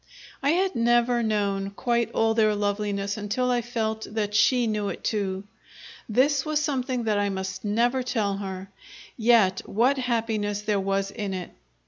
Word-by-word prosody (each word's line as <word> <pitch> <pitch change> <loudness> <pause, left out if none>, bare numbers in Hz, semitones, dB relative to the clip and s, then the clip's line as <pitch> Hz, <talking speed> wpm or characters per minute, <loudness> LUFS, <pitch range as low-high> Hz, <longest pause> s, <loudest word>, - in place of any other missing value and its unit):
I 280 - +1
had 380 +2 +1
never 240 +1 +3
known 200 -3 0
quite 235 +3 -1
all 225 0 +2
their 215 -2 +3
loveliness 205 0 -1
until 215 +5 -1
I 245 -1 +2
felt 220 -2 -3
that 210 -2 -1
she 245 +3 +4
knew 210 -2 -1
it - - -7
too. 195 -3 -1 0.7
This 265 +5 +3
was 305 -1 0
something 260 -4 -1
that 215 -2 +1
I 205 0 +1
must 190 0 -4
never 235 +5 +1
tell 215 -6 -1
her 190 -1 -6 0.5
yet 220 -5 +4
what 255 +6 +2
happiness 220 -4 -1
there 210 -1 +1
was 195 0 -1
in 200 -1 -4
it! 180 -1 -6
220 Hz, 160 wpm, -25 LUFS, 200-240 Hz, 0.7 s, she